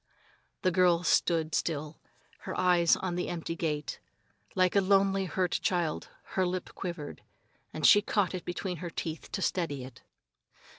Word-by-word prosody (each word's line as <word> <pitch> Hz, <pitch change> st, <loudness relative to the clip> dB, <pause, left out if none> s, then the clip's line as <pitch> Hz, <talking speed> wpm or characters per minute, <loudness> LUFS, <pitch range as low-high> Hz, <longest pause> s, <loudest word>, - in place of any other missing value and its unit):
The 185 Hz, -, +3 dB
girl 180 Hz, -1 st, +4 dB
stood 160 Hz, -2 st, +2 dB
still, 155 Hz, -1 st, -2 dB, 0.4 s
her -, -, -5 dB
eyes 175 Hz, -2 st, +4 dB
on 185 Hz, -2 st, -3 dB
the 180 Hz, +1 st, -2 dB
empty 165 Hz, -1 st, -4 dB
gate. 150 Hz, -3 st, -3 dB, 0.6 s
Like 185 Hz, 0 st, +3 dB
a 200 Hz, -, +6 dB
lonely, 195 Hz, 0 st, +3 dB
hurt 180 Hz, +1 st, 0 dB
child 175 Hz, -4 st, -1 dB, 0.2 s
her 190 Hz, -, +2 dB
lip 180 Hz, 0 st, -3 dB
quivered, 170 Hz, -5 st, -6 dB, 0.5 s
and 155 Hz, -2 st, -2 dB
she 205 Hz, -, +8 dB
caught 205 Hz, -3 st, 0 dB
it 180 Hz, -2 st, -4 dB
between 180 Hz, 0 st, -4 dB
her 170 Hz, +2 st, -5 dB
teeth 160 Hz, 0 st, -5 dB
to 190 Hz, -, -2 dB
steady 145 Hz, -7 st, -1 dB
it. 125 Hz, -1 st, -11 dB
175 Hz, 155 wpm, -30 LUFS, 160-185 Hz, 0.6 s, she